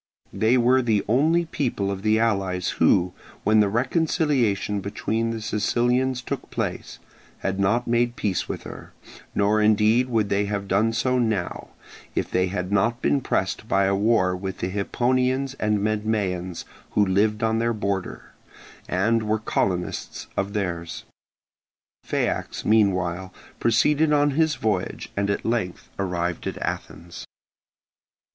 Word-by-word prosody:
They 115 +4 +3
were 125 +2 +4
the 110 -4 +1
only 155 +9 +3
people 120 -11 -2
of 95 -1 -4
the 110 +1 +3
allies 95 -5 0
who, 90 0 +4 0.3
when 110 +1 +4
the 105 -1 +4
reconciliation 125 - +1
between 110 +3 -2
the 115 -1 -4
Sicilians 125 +4 +1
took - - -5
place, - - -4 0.4
had 95 0 -2
not 110 +5 +2
made 120 0 +1
peace 95 -6 -2
with - - -4
her; - - -10 0.4
nor 105 +1 +3
indeed 110 +4 +3
would 110 -4 +1
they 100 +1 +1
have 100 -1 -3
done 105 +4 +2
so 125 +3 +1
now, 110 -7 -1 0.5
if - - -1
they 90 0 +2
had 90 0 -3
not 110 +4 +2
been 140 +1 +1
pressed 95 -1 -1
by 100 -2 +2
a 95 0 +2
war 100 -3 +2
with 95 0 -5
the 90 - -2
Hipponians 130 +6 0
and 105 0 +1
Medmaeans 105 -5 -1 0.3
who 105 - +4
lived 105 +3 +1
on 110 0 +2
their 115 +1 +1
border, 100 -4 -3 0.6
and 110 +5 +2
were 110 0 0
colonists 90 -4 -2
of 100 +1 -2
theirs. 85 -5 -3 1.0
Phaeax - - -2
meanwhile 95 -4 +2 0.3
proceeded 150 +7 +3
on 145 0 +3
his 155 +1 +2
voyage, 105 -7 -2
and 100 0 0
at 100 - -1
length 110 -6 -2
arrived 90 -3 -2
at - - -4
Athens. 85 0 -6
105 Hz, 140 wpm, -24 LUFS, 95-120 Hz, 1.0 s, were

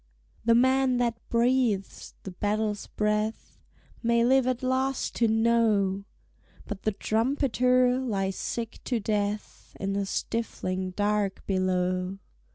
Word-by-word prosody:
The 230 +1 +4
man 260 +1 +3
that 235 -2 0
breathes 235 -4 0
the 190 - -6
battle's 210 +2 -1
breath 210 +1 -2 0.4
May 235 0 +3
live 260 0 +4
at 255 0 -1
last 260 +1 0
to 235 - +3
know; 220 -4 +2 0.6
But 205 -3 -6
the 215 - 0
trumpeter 250 +3 +2
lies 195 -7 -1
sick 230 -1 -4
to 245 -3 0
death 210 0 -3
In 195 +1 -2
the 200 0 -1
stifling 185 -5 -2
dark 205 -1 0
below. 185 0 0
220 Hz, 120 wpm, -27 LUFS, 200-245 Hz, 0.6 s, The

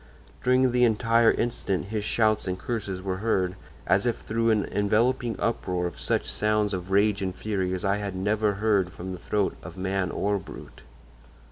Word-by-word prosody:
During 130 0 +4
the 125 0 +3
entire 115 0 +4
incident 100 -5 -1
his 110 -1 -2
shouts 110 -1 +1
and 90 0 -1
curses 95 -2 -4
were 95 -1 -2
heard, 95 -3 0 0.3
as 100 +5 +2
if 120 - 0
through 115 +1 -1
an 105 -2 +2
enveloping 115 +4 +1
uproar 90 -6 -1
of 85 - -5
such - - +1
sounds 105 -1 +1
of 90 0 -4
rage 100 +1 +3
and 95 -1 -2
fury 95 -4 -2
as 95 - -4
I 100 +1 +2
had 100 -2 -4
never 105 +2 +1
heard 100 -3 +1
from 95 +2 -7
the 90 - -6
throat 100 +2 -1
of 90 - -10
man 95 0 -1
or 100 +2 0
brute! 95 - -11
105 Hz, 180 wpm, -26 LUFS, 95-110 Hz, 0.3 s, During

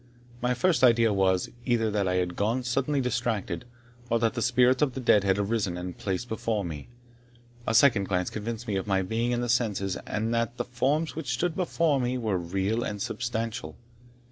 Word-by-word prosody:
My 125 +1 +1
first 135 0 +2
idea 115 -3 +5
was, 95 -2 +2
either 115 -3 +1
that 100 -2 0
I 90 - +1
had 90 -1 -1
gone 115 +5 0
suddenly 135 +3 0
distracted, 120 -2 -2 0.4
or 115 - +3
that 115 -1 +1
the 120 - -3
spirits 125 +3 +3
of 140 -4 +1
the - - -3
dead 105 -5 +4
had 95 0 +2
arisen 100 -3 -1
and 90 +1 -4
been 90 - -11
placed 95 +4 -2
before 110 -3 -2
me. 75 -4 -6 0.8
A 115 - +1
second 115 -5 +5
glance 90 -2 -1
convinced 115 +2 -5
me 100 -2 0
of 95 - -3
my 95 -1 +2
being 115 +5 -1
in 120 0 0
my - - -1
senses, 110 -6 0
and 110 +2 -1
that 115 +1 -1
the - - -2
forms 135 +6 0
which 145 -6 -3
stood 165 +7 -1
before 165 -5 +1
me 125 +1 -1
were 110 -6 -1
real 95 +6 -1
and 105 0 -4
substantial. 115 +3 -3
115 Hz, 200 wpm, -27 LUFS, 100-125 Hz, 0.8 s, idea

